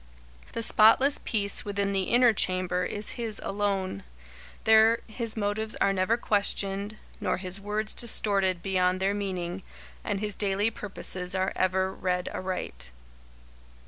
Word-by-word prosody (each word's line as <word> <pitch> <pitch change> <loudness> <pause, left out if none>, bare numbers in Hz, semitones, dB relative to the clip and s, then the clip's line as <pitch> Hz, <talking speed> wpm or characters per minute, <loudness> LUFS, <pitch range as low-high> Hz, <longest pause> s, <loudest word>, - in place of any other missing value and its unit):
The 230 - 0
spotless 225 +6 +5
peace 200 -3 -2
within 200 -1 -2
the 190 -1 0
inner 240 +1 +4
chamber 185 -2 0
is 210 +3 -4
his 220 -3 -2
alone. 195 - -2 0.6
There 220 +1 +5
his 225 0 -3
motives 215 +1 -2
are 195 - +2
never 195 +5 +1
questioned, 200 -1 0 0.2
nor - - -1
his 185 +1 0
words 210 +1 -2
distorted 195 -6 +1
beyond 185 -1 +1
their 195 +1 +1
meaning, 185 -3 -4 0.4
and 200 -1 -2
his 210 -1 -2
daily 205 +2 +1
purposes 185 -3 -3
are 190 0 0
ever 190 +1 +1
read 180 -1 -2
aright. 180 - -5
200 Hz, 135 wpm, -27 LUFS, 185-215 Hz, 0.6 s, spotless